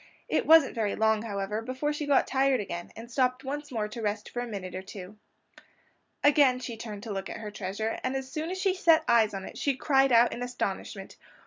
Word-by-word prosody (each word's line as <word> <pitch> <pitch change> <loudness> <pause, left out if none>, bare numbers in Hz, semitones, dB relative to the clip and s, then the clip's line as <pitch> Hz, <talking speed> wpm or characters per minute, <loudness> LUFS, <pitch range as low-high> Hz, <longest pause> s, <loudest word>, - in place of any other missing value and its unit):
It - - 0
wasn't 320 -3 +7
very 215 -4 -1
long, 220 -1 +2
however, 210 -1 -3
before 260 +5 -2
she 295 0 -4
got 280 -2 +4
tired 270 -1 +2
again 175 -4 -5
and 235 +2 -10
stopped 255 0 +1
once 290 +2 -5
more 220 -4 -1
to 230 +2 -7
rest 210 0 -2
for 245 - -4
a 245 - -4
minute 190 -5 -6
or 185 - -4
two. 195 +1 -10 1.0
Again 285 -3 +5
she 250 -2 -6
turned 215 -2 -7
to 220 - -5
look 195 0 -4
at - - -6
her 215 -1 -7
treasure, 205 +2 -3
and 255 +1 -1
as 265 -1 -3
soon 315 +2 -3
as 375 - -3
she 380 0 +1
set 330 -4 +4
eyes 225 -3 +4
on 190 -1 -5
it - - -9
she 280 -2 +1
cried 270 0 +3
out 235 0 +5
in 245 - -6
astonishment. 200 -5 -4
235 Hz, 225 wpm, -28 LUFS, 210-270 Hz, 1.0 s, wasn't